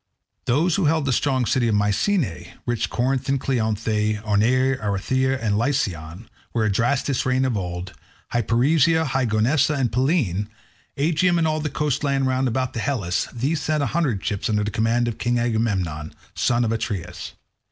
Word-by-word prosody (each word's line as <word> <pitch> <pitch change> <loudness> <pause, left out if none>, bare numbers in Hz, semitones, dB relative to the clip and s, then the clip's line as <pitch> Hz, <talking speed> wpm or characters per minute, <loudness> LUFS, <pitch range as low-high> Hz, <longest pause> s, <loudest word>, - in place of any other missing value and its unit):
Those 155 +8 +2
who 195 - +1
held 155 -1 +2
the 135 - +1
strong 130 0 +1
city 120 +1 +1
of 110 - +2
Mycenae, 105 - 0
rich 120 -2 -1
Corinth 130 +2 -1
and 135 0 +2
Cleonae; 110 -4 0
Orneae, 125 +6 +2
Araethyrea, 130 +7 0
and 110 -4 0
Licyon, 100 - -2 0.3
where 110 -2 +1
Adrastus 120 +6 +1
reigned 130 +1 +1
of 125 -3 0
old; 90 -1 -4 0.4
Hyperesia, 145 +8 +3
high 130 -3 0
Gonoessa, 130 +7 +2
and 130 -4 0
Pellene; 125 - +1 0.5
Aegium 170 +4 +2
and 165 -1 +2
all 155 0 0
the 150 0 -2
coast 150 0 -1
land 135 -1 +1
round 130 0 +1
about 130 +1 -1
Helice; 115 -7 -1
these 140 +7 -1
sent 150 0 0
a - - -2
hundred 140 - 0
ships 105 +3 -2
under 105 -1 +1
the 105 - -2
command 115 +3 +1
of 115 - -4
King 120 +2 0
Agamemnon, 100 -10 -1 0.2
son 120 0 +1
of 110 - 0
Atreus. 90 -6 -4
120 Hz, 165 wpm, -23 LUFS, 105-140 Hz, 0.5 s, Hyperesia